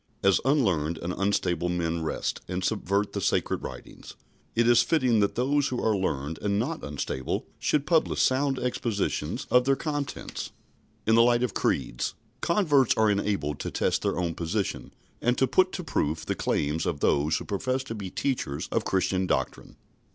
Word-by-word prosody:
As 95 -3 +4
unlearned 95 - +2
and 85 +2 -4
unstable 90 -4 0
men 85 -1 -1
wrest 80 - -2
and 90 +1 -3
subvert 100 -1 0
the - - -2
Sacred - - 0
Writings, - - -9 0.4
it 115 0 +3
is 120 -1 +6
fitting 130 -8 +2
that 100 -1 +1
those 140 +3 +2
who 125 - -2
are 110 -1 +2
learned 80 -5 -2
and 100 -1 0
not 145 +10 -2
unstable 70 -2 -3
should 145 -2 +1
publish 165 -1 +2
sound 135 +1 +2
expositions 115 - -2
of 125 0 +5
their 135 0 +3
contents. 145 -1 -4 0.6
In 110 - +3
the 115 - +7
light 120 +1 +4
of 125 - -1
creeds, - - -1 0.3
converts 150 - +3
are 110 -1 +4
enabled 100 -8 -1
to - - -3
test - - 0
their - - -1
own 85 -2 -1
position, 95 +5 -3 0.3
and 120 +1 +2
to 130 - +4
put 185 +7 +3
to 180 - -4
proof 80 - -1
the - - 0
claims 75 +3 -1
of 70 - -2
those 75 +3 +2
who - - -6
profess 130 +6 -1
to 130 - -6
be 100 -4 -5
teachers 105 - -2
of - - +1
Christian 95 0 0
doctrine. - - -2
105 Hz, 175 wpm, -27 LUFS, 85-130 Hz, 0.6 s, the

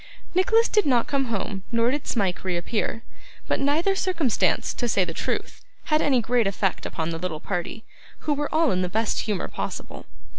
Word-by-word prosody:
Nicholas 450 +6 +4
did 420 -6 +2
not 245 -4 +3
come 275 -1 0
home 205 -4 -3
nor 230 +1 +3
did 290 +1 -3
Smike 195 -6 0
reappear; 190 +5 -2 0.4
but - - +1
neither 310 +8 +2
circumstance, 350 - +1
to 245 - -2
say 200 -3 +3
the 165 - -5
truth, - - -3 0.2
had 305 -1 +2
any 260 -4 +3
great 235 -1 +2
effect 195 -1 -1
upon 160 +1 -3
the 165 - -4
little 165 -3 -3
party, 195 +6 -4 0.4
who 300 - +1
were 290 0 -2
all 320 -1 +3
in 185 -1 +1
the 180 - -1
best 220 +3 0
humour 210 -4 -1
possible. - - -6
230 Hz, 185 wpm, -25 LUFS, 190-295 Hz, 0.4 s, Nicholas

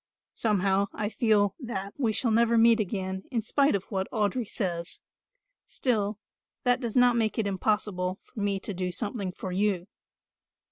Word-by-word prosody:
Somehow 200 -2 +2
I 210 -1 -2
feel 215 -4 +2
that 200 -7 -5
we 240 -6 +1
shall 230 +2 +1
never 230 +1 +4
meet 230 0 +6
again 190 -2 -2
in 230 -4 -1
spite 280 +3 +3
of 195 - -1
what 190 -1 -1
Audry 215 +2 0
says; 170 -4 -3 0.7
still 215 -5 0 0.5
that 245 +1 +3
does 235 -3 -3
not 245 -1 +5
make 220 -2 0
it 220 - +1
impossible 195 -2 0
for 235 - -11
me 200 -1 0
to 205 - -4
do 180 0 -2
something 200 0 -3
for 185 +1 -6
you. 190 -1 0
210 Hz, 160 wpm, -28 LUFS, 190-230 Hz, 0.7 s, meet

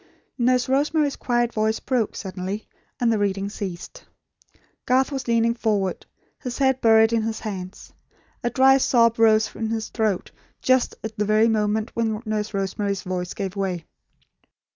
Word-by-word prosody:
Nurse 250 +1 +2
Rosemary's 285 +2 +1
quiet 240 -1 0
voice 220 0 0
broke, 245 -5 -1
suddenly; 190 +1 -5 0.3
and 235 -2 +2
the 215 - 0
reading 200 -1 -1
ceased. 190 -4 -7 0.8
Garth 260 +2 +3
was 270 -3 -4
leaning 230 0 +2
forward, 210 -5 -1 0.3
his 250 -1 -5
head 265 -1 +2
buried 225 0 +5
in 230 - +2
his 220 0 -3
hands. 190 -3 -7 0.5
A 240 - +1
dry 265 +2 +5
sob 230 -3 +3
rose 220 -1 +4
in 225 -1 -3
his 220 -1 -3
throat, 215 -5 -1 0.3
just 255 -1 +2
at 220 0 -5
the 210 - 0
very 215 +2 +4
moment 215 0 0
when 225 -2 -1
Nurse 215 -1 -2
Rosemary's 200 0 -2
voice 180 -1 -4
gave 195 0 -4
way. 185 -4 -2
220 Hz, 155 wpm, -23 LUFS, 205-240 Hz, 0.8 s, buried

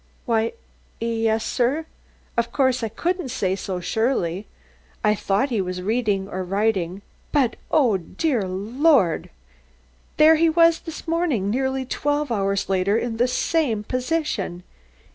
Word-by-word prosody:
"Why, 225 -3 +1 0.5
yes, 225 -1 0
sir; 270 +6 0 0.5
of 235 0 0
course 260 -1 +2
I 225 - -2
couldn't 350 - -2
say 190 -6 0
so 190 -2 -4
surely. 205 -3 -1 0.6
I 210 -1 +4
thought 205 +5 0
he 220 -4 +1
was 180 0 -4
reading 210 -2 0
or 185 -1 -4
writing, 195 -1 -1 0.3
but 265 -6 +2
oh, 250 -10 +3
dear 220 - -1
Lord! 210 - +2 0.9
there 310 +1 +7
he 330 +1 +4
was 330 0 +4
this 325 0 -9
morning, 315 - 0
nearly 265 +2 -1
twelve 290 +1 -1
hours 195 -2 0
later, 195 +2 +2
in 240 +1 -2
just 225 - -6
the 245 - +4
same 250 -4 0
position." 255 - -2
230 Hz, 140 wpm, -23 LUFS, 195-280 Hz, 0.9 s, there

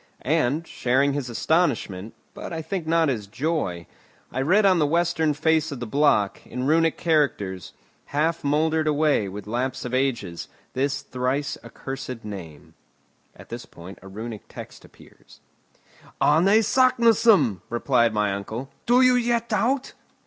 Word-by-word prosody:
And, 155 +2 +1
sharing 135 +1 +1
his 140 -3 -3
astonishment, 115 - 0 0.2
but - - -8
I 160 -1 -4
think 165 0 -4
not 165 0 +3
his 110 -7 -2
joy, 110 - -2 0.5
I 130 - -2
read 190 +9 +3
on 185 -3 +4
the 150 - +3
western 165 -1 +1
face 160 +1 +1
of 140 - -6
the 120 - -4
block, 110 -5 +2
in 125 +1 -5
Runic 165 +2 +2
characters, 120 - 0 0.3
half 160 +3 -1
mouldered 155 +2 +1
away 150 -8 +2
with 100 +1 -8
lapse 125 +4 -3
of 125 - -5
ages, 120 -10 -1 0.3
this 140 +2 -1
thrice 130 +3 -2
accursed 130 -4 -7
name: 85 -8 -9 0.6
[At - - -15
this - - -7
point 90 +3 -12
a 95 - -12
Runic 110 +2 -8
text - - -10
appears] - - -19 0.8
"Arne 200 +7 +4
Saknussemm!" 230 - +4
replied 120 0 +2
my 105 -2 0
uncle. 110 +7 -6 0.2
"Do 245 +2 +5
you 255 0 +6
yet 235 -1 0
doubt?" 260 +2 0
140 Hz, 145 wpm, -24 LUFS, 115-165 Hz, 0.8 s, you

